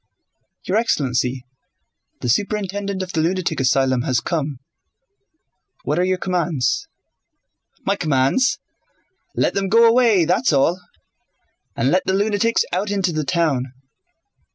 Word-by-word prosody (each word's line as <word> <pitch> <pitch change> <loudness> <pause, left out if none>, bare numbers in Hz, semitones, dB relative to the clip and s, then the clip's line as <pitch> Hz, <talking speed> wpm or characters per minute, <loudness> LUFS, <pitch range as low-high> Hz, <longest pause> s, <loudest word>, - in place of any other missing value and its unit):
"Your 190 - 0
excellency, 130 - 0 0.8
the - - -3
superintendent 200 - -1
of 185 - -8
the 160 - +1
lunatic 170 -1 -1
asylum 130 -1 +2
has 125 -1 0
come: 150 -4 -3 1.3
what - - -1
are - - +3
your 185 0 +1
commands?" 160 -8 -1 1.0
"My 200 - +1
commands? 155 - +1 0.8
Let - - +1
them 195 -1 -1
go 230 +3 +6
away, 230 -7 +4
that's 180 +4 +1
all.... 165 +6 +2 0.9
And 130 +4 +1
let 185 - +3
the 190 - +1
lunatics 210 +3 +1
out 195 +3 -1
into 195 -4 0
the 155 0 -1
town. 145 -4 0
180 Hz, 125 wpm, -20 LUFS, 140-200 Hz, 1.3 s, go